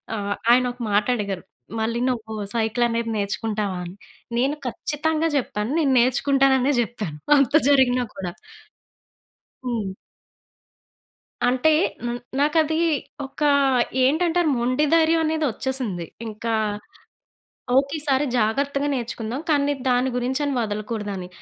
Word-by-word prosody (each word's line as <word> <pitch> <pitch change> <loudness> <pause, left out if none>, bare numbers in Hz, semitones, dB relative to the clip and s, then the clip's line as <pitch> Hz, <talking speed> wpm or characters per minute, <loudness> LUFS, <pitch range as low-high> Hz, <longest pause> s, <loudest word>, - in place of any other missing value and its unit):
ఆహ్, 205 -1 -2 0.2
ఆయనొక 250 0 +2
మాటడిగారు. 205 -2 0 0.4
మళ్ళీ 230 +2 -1
నువ్వు 225 -3 -3 0.2
సైకిల‌నేది 230 +1 0
నేర్చుకుంటావా 205 -1 -2
అని? 175 +2 -8 0.4
నేను 270 +4 +1
ఖచ్చితంగా 310 +6 -1
జెప్పాను 230 -4 -1
నేను 280 -4 +2
నేర్చుకుంటాననే 265 +2 +3
జెప్పాను 210 -10 -5 0.2
అంత 275 0 +2 0.2
జరిగినా 255 -3 +4
కూడా. 180 -3 -5 1.3
హ్మ్. 220 -6 -2 1.5
అంటే 255 +5 +3 0.3
హ్మ్, 240 0 -3 0.2
నాకది 315 +2 +2 0.5
ఒక 270 +3 -13 0.6
ఏంటంటారు 330 +4 +2
మొండి 255 +5 +1
ధైర్యం 330 0 +4
అనేది 315 0 0
వచ్చేసింది. 225 -8 -3 0.2
ఇంకా, 225 +1 -3 1.2
ఓకె 275 +2 +2
ఈ - - -5
సారి 270 +1 +2
జాగ్రత్తగా 280 +6 0
నేర్చుకుందాం. 240 +1 -4
కానీ 290 -2 +3
నేను 285 -3 -2
దాని 250 +1 +2
గురించని 265 +4 -1
వదలకూడదని. 210 -3 -4
245 Hz, 105 wpm, -23 LUFS, 220-280 Hz, 1.5 s, జరిగినా